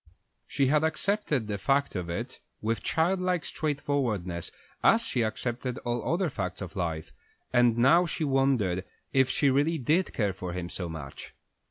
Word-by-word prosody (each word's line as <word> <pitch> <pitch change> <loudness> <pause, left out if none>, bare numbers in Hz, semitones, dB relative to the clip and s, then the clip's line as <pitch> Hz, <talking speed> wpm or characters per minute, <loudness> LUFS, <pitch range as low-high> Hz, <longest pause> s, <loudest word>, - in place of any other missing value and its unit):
She 140 - +1
had 150 +3 +3
accepted 160 - 0
the 105 -1 -3
fact 140 +3 +1
of 90 -2 -3
it 85 - -4 0.2
with 115 +1 -1
childlike 180 -1 +1
straightforwardness 130 - -2 0.3
as 230 0 +5
she 130 - 0
accepted 120 +3 -2
all 120 +3 -1
other 180 +2 +1
facts 95 - -4
of 95 -4 -7
life, 80 -4 -3 0.4
and 120 -2 +4
now 165 +9 +5
she 160 - -3
wondered 135 -10 +2 0.3
if 135 -1 +4
she 140 0 +3
really 145 +5 +2
did 155 +7 +1
care 105 -4 0
for 90 -2 -5
him 90 -1 -4
so 90 -2 -4
much. 75 -4 -8
125 Hz, 160 wpm, -28 LUFS, 95-150 Hz, 0.4 s, as